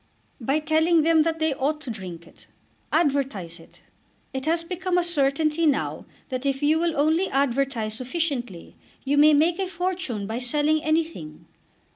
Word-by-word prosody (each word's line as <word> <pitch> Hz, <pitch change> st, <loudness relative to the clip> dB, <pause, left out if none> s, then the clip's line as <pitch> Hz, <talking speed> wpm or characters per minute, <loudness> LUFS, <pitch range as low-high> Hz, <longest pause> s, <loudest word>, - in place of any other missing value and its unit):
"By 270 Hz, +4 st, 0 dB
telling 315 Hz, +1 st, +2 dB
them 325 Hz, 0 st, +4 dB
that 325 Hz, +1 st, 0 dB
they 315 Hz, -2 st, +1 dB
ought 285 Hz, +3 st, -1 dB
to 270 Hz, -5 st, -5 dB
drink 180 Hz, -6 st, -8 dB
it. -, -, -17 dB, 0.4 s
Advertise 270 Hz, -, 0 dB
it. 165 Hz, -, -18 dB, 0.5 s
It 265 Hz, +2 st, -4 dB
has 335 Hz, +1 st, +2 dB
become 360 Hz, +1 st, -2 dB
a 355 Hz, -, +3 dB
certainty 310 Hz, 0 st, +1 dB
now 285 Hz, -1 st, -1 dB, 0.2 s
that 255 Hz, -1 st, -3 dB
if 275 Hz, 0 st, -1 dB
you 310 Hz, +2 st, +3 dB
will 335 Hz, -2 st, 0 dB
only 320 Hz, +6 st, +2 dB
advertise 265 Hz, -5 st, 0 dB
sufficiently 255 Hz, -, -4 dB, 0.3 s
you 280 Hz, +2 st, +1 dB
may 300 Hz, +1 st, +6 dB
make 330 Hz, +5 st, +2 dB
a 385 Hz, -, -1 dB
fortune 355 Hz, -, -3 dB
by 220 Hz, +4 st, -3 dB
selling 300 Hz, +5 st, +1 dB
anything. 310 Hz, -, -2 dB
295 Hz, 160 wpm, -24 LUFS, 255-325 Hz, 0.5 s, may